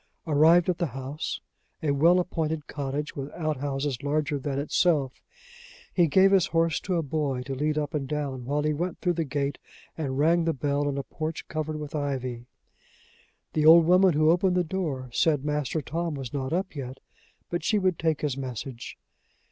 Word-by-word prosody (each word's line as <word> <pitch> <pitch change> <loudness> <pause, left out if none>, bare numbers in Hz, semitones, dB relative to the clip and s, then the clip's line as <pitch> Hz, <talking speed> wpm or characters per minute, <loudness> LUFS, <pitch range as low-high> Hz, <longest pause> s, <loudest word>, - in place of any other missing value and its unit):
Arrived 160 +3 +5
at 180 -2 0
the 175 - +1
house 135 +3 -4 0.4
a 150 - +2
well 165 +6 +5
appointed 160 -4 -2
cottage, 145 +1 -4
with 140 0 -5
out 155 -3 -2
houses 135 -1 -2
larger 145 0 0
than 135 0 -3
itself 145 -2 +1 0.7
he 175 -3 +4
gave 190 +5 +5
his 195 -3 +4
horse 165 -1 +1
to 185 - -2
a 165 - +1
boy 140 -3 -2
to 135 - -5
lead 150 +3 -1
up 150 0 -2
and 145 -3 -2
down, 140 -3 -3
while 145 +4 -1
he 150 0 +1
went 170 +3 -3
through 180 -1 0
the 165 -1 -1
gate 140 -1 -2 0.4
and 135 -4 -3
rang 165 +4 +3
the 165 - +1
bell 145 +1 0
in 140 - -3
a 140 - -2
porch 155 +3 -5
covered 155 0 -3
with 150 -1 -7
ivy. 130 -5 -3 1.1
The 155 0 +3
old 165 0 +9
woman 180 +1 +5
who 155 +1 +4
opened 180 +1 +2
the 180 - +3
door 155 -7 -3
said 150 -1 +2
Master 150 0 -1
Tom 165 +2 -3
was 135 -4 -6
not 135 -2 -3
up 185 0 -2
yet, 130 -2 -6 0.5
but 175 -2 -2
she 210 - +2
would 185 -4 +1
take 160 -2 0
his 145 -4 -1
message. 130 -2 -6
150 Hz, 190 wpm, -27 LUFS, 140-165 Hz, 1.1 s, old